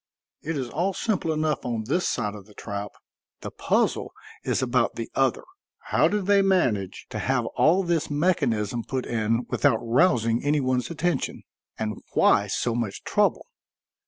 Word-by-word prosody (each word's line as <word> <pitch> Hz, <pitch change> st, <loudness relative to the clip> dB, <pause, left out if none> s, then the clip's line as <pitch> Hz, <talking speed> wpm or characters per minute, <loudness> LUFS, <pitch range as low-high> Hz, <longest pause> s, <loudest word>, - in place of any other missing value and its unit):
It 160 Hz, 0 st, -3 dB
is 130 Hz, -3 st, -2 dB
all 175 Hz, +10 st, -1 dB
simple 195 Hz, -7 st, -1 dB
enough 155 Hz, -1 st, -1 dB
on 115 Hz, -3 st, -2 dB
this 175 Hz, +10 st, 0 dB
side 105 Hz, -4 st, -1 dB
of 100 Hz, -1 st, -11 dB
the 105 Hz, -, -18 dB
trap; 100 Hz, -1 st, -5 dB, 0.5 s
the -, -, -6 dB
puzzle -, -, 0 dB, 0.3 s
is 130 Hz, -, 0 dB
about 125 Hz, -1 st, +1 dB
the 115 Hz, -, -5 dB
other. 135 Hz, -1 st, +1 dB, 0.5 s
How -, -, +5 dB
did 205 Hz, -2 st, -1 dB
they 200 Hz, 0 st, +5 dB
manage 125 Hz, -, +1 dB
to -, -, -3 dB
have -, -, 0 dB
all 180 Hz, +5 st, +4 dB
this 170 Hz, -3 st, 0 dB
mechanism 130 Hz, -, 0 dB
put 130 Hz, +1 st, -3 dB
in 115 Hz, +1 st, 0 dB
without 115 Hz, -, +3 dB
rousing 115 Hz, -2 st, +2 dB
any 145 Hz, +1 st, +2 dB
one's 130 Hz, -2 st, 0 dB
attention? 170 Hz, +1 st, -2 dB, 0.3 s
And 105 Hz, -2 st, -3 dB, 0.2 s
why -, -, +4 dB
so 120 Hz, -, -1 dB
much 115 Hz, -4 st, -3 dB
trouble?" -, -, +1 dB
130 Hz, 160 wpm, -25 LUFS, 115-165 Hz, 0.5 s, How